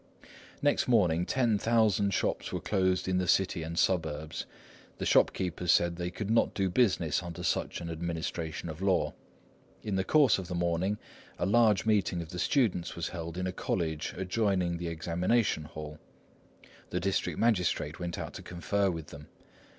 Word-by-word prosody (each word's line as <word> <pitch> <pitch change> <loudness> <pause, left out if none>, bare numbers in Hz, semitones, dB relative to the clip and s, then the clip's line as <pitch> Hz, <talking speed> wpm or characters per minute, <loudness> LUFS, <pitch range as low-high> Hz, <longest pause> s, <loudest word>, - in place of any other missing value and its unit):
Next 145 - +2
morning 90 -8 +3
ten 120 -5 +2
thousand 110 -3 +3
shops - - -1
were - - -2
closed 95 -2 0
in 90 0 +1
the 90 - -1
city 90 -1 +2
and 80 +1 -5
suburbs. 80 -4 0 0.5
The - - -3
shopkeepers 90 -2 +2
said 85 0 +3
they 90 0 -3
could 105 +3 -4
not 115 - +2
do 95 -2 0
business 90 - +2
under 90 0 -7
such 85 - -1
an 85 - -5
administration 80 -1 -4
of 80 +2 -7
law. 95 -1 +1 0.7
In 100 -3 -1
the 95 - +1
course 145 -2 +4
of 95 - -6
the 90 - -4
morning 85 +4 0 0.4
a - - 0
large 105 -2 +4
meeting 100 -5 +2
of 85 -2 -6
the 90 0 -6
students 105 - +1
was 85 - -3
held 85 -1 -6
in 90 - -2
a 95 - -1
college 80 -4 -2
adjoining 95 -2 0
the 85 0 -4
examination 85 +3 0
hall. 75 -1 -8 0.9
The 90 - -1
district 95 +1 -1
magistrate 90 -9 +1
went 85 -1 -4
out - - -5
to - - -8
confer 90 +4 -1
with 80 -4 -5
them. 75 +1 -11
90 Hz, 170 wpm, -30 LUFS, 85-100 Hz, 0.9 s, course